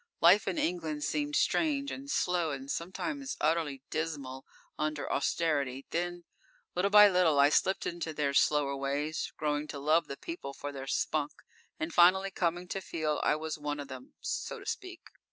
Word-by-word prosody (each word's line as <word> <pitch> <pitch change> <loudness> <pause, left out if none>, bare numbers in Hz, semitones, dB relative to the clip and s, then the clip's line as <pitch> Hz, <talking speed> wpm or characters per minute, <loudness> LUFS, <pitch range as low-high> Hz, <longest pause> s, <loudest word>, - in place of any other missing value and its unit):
Life 185 +5 +6
in 190 - -1
England 160 -4 -1
seemed 295 - -1
strange 285 -4 +1
and 275 +1 -7
slow 180 - +1
and 135 -1 -5
sometimes 270 - -4
utterly 150 -4 0
dismal 140 -5 -4 0.3
under 150 -1 -2
Austerity. 140 -3 0
Then, 175 +1 -2 0.5
little 185 +3 +1
by 210 0 +9
little 180 -6 +3
I 140 +1 +7
slipped 190 +5 +2
into 170 -2 -3
their 145 -2 -1
slower 140 -1 +3
ways, 140 +3 -2
growing 150 0 -1
to 145 - -6
love 155 +3 +2
the 140 - -6
people 335 - -7
for 145 - -5
their 135 -1 -7
spunk, 150 +1 0 0.5
and 160 +1 -3
finally 190 +3 +5
coming 175 0 -1
to 195 - -3
feel 155 -4 -2
I - - +3
was 155 0 -4
one 145 0 -3
of 145 - -7
them, 130 -1 -10
so - - -3
to - - -12
speak. 370 -3 -5
160 Hz, 170 wpm, -31 LUFS, 145-180 Hz, 0.5 s, by